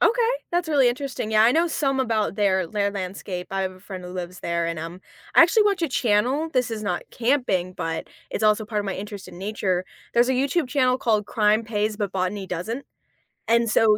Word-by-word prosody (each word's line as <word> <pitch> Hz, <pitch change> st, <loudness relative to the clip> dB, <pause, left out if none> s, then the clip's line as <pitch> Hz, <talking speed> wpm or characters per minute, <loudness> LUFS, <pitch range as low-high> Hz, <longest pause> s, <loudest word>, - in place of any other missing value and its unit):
Ok, -, -, +5 dB, 0.4 s
that's 345 Hz, -1 st, 0 dB
really 280 Hz, -5 st, +4 dB
interesting. 250 Hz, -3 st, -3 dB
Yeah, 215 Hz, 0 st, +6 dB
I 230 Hz, -, +6 dB
know 325 Hz, +6 st, +3 dB
some 275 Hz, -5 st, 0 dB
about 225 Hz, -6 st, 0 dB
their 190 Hz, -4 st, +2 dB
their 200 Hz, 0 st, 0 dB
landscape. 185 Hz, -1 st, -5 dB
I 195 Hz, 0 st, -1 dB
have 185 Hz, -, -2 dB
a 185 Hz, -, -16 dB
friend 190 Hz, -2 st, -8 dB
who 180 Hz, -, -7 dB
lives 180 Hz, 0 st, -6 dB
there 170 Hz, 0 st, -1 dB
and, 170 Hz, -1 st, -3 dB
um, 165 Hz, +3 st, -7 dB, 0.3 s
I -, -, +9 dB
actually 415 Hz, +6 st, +4 dB
watch 395 Hz, -4 st, +1 dB
a 330 Hz, -, +2 dB
channel 250 Hz, +6 st, +1 dB
this 250 Hz, -2 st, +1 dB
is 215 Hz, -1 st, -4 dB
not 180 Hz, -3 st, -1 dB
camping, 230 Hz, -8 st, 0 dB
but 165 Hz, -3 st, -3 dB, 0.2 s
it's 215 Hz, -, -2 dB
also 215 Hz, 0 st, +3 dB
part 210 Hz, 0 st, -3 dB
of 205 Hz, -, -1 dB
my 195 Hz, -, -2 dB
interest 205 Hz, 0 st, -7 dB
in 175 Hz, -, -11 dB
nature. 190 Hz, -2 st, -1 dB, 0.3 s
There's 240 Hz, +2 st, +4 dB
a -, -, +3 dB
YouTube 275 Hz, +3 st, +1 dB
channel 255 Hz, -2 st, +2 dB
called 215 Hz, -5 st, +1 dB
Crime 215 Hz, +1 st, +2 dB
Pays, 215 Hz, -1 st, -1 dB
but 205 Hz, -2 st, -2 dB
Botany 190 Hz, +1 st, -2 dB
Doesn't, 200 Hz, +10 st, -4 dB, 0.6 s
and 230 Hz, +1 st, +3 dB
so 215 Hz, -1 st, +4 dB
215 Hz, 220 wpm, -24 LUFS, 190-250 Hz, 0.6 s, I